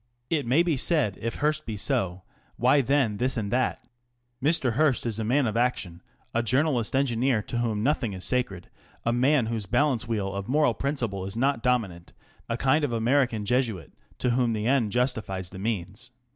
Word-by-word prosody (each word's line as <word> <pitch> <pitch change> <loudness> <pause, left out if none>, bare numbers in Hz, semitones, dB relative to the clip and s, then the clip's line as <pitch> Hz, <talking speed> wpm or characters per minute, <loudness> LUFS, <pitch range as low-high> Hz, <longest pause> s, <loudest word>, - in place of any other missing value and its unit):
It 145 -6 0
may 140 +8 +4
be 165 -5 0
said 130 - +1
if 115 +1 -3
Mr. - - -9
Hearst 155 +1 +1
be 110 -2 -4
so, 95 -2 -1 0.3
why 130 +4 +4
then 130 -5 +1
this 130 +3 0
and 105 -3 -2
that? 130 +1 -1 0.6
Mr. 140 -5 +2
Hearst 140 -1 +2
is 115 -2 -2
a - - -1
man 130 +5 +2
of 110 -2 -2
action, 110 -8 -1 0.3
a 115 - +2
journalist 125 0 +1
engineer 125 -3 +1
to 120 - -3
whom 110 -3 -1
nothing 125 -6 0
is 95 0 -5
sacred, 120 -8 -2 0.3
a 115 - +2
man 130 +1 +3
whose 110 -3 -3
balance 135 -1 +1
wheel 100 -4 -2
of 100 0 -5
moral 145 -2 +3
principle 115 -7 -2
is 100 +3 -5
not 135 -1 +1
dominant, 110 -9 -1 0.4
a 115 - -1
kind 135 +5 +2
of 145 - 0
American 115 -1 +1
Jesuit 115 - -1 0.3
to 125 - 0
whom 120 -1 +1
the 105 -1 -2
end 120 -4 +2
justifies 110 -7 -1
the 95 - -9
means. 105 +2 -4
120 Hz, 190 wpm, -26 LUFS, 105-135 Hz, 0.6 s, may